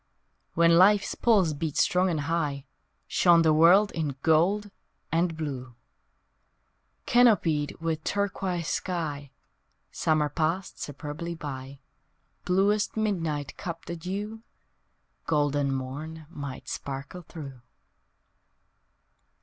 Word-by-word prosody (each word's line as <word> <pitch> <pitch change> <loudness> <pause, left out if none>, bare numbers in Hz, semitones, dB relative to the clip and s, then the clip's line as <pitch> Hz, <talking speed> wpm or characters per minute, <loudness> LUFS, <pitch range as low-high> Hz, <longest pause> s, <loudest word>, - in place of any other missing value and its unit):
When 170 0 +5
Life's 200 +2 +5
pulse 200 -9 +3
beat 150 0 -4
strong 180 +1 +3
and 160 -4 -1
high 145 -3 -2 0.4
Shone 170 -2 +4
the 160 -1 +4
world 180 +7 +6
in 150 -5 -3
gold 190 +6 +2 0.4
and 165 0 +1
blue! 130 -6 -5 1.3
Canopied 190 - +3
with 160 -1 -2
turquoise 190 -4 -2
sky 150 -6 -3 0.6
Summer 155 -1 +1
passed 165 +6 -2
superbly 150 +4 -5
by, 135 -3 -7 0.6
Bluest 200 +4 +1
midnight 165 -9 -1
cupped 170 -4 -6
the 170 - -4
dew 200 +6 -5 0.9
Golden 145 -2 +1
morn 145 +5 -5
might 140 -4 -7
sparkle 140 +6 -6
through! 140 -6 -10
165 Hz, 100 wpm, -27 LUFS, 145-180 Hz, 1.3 s, world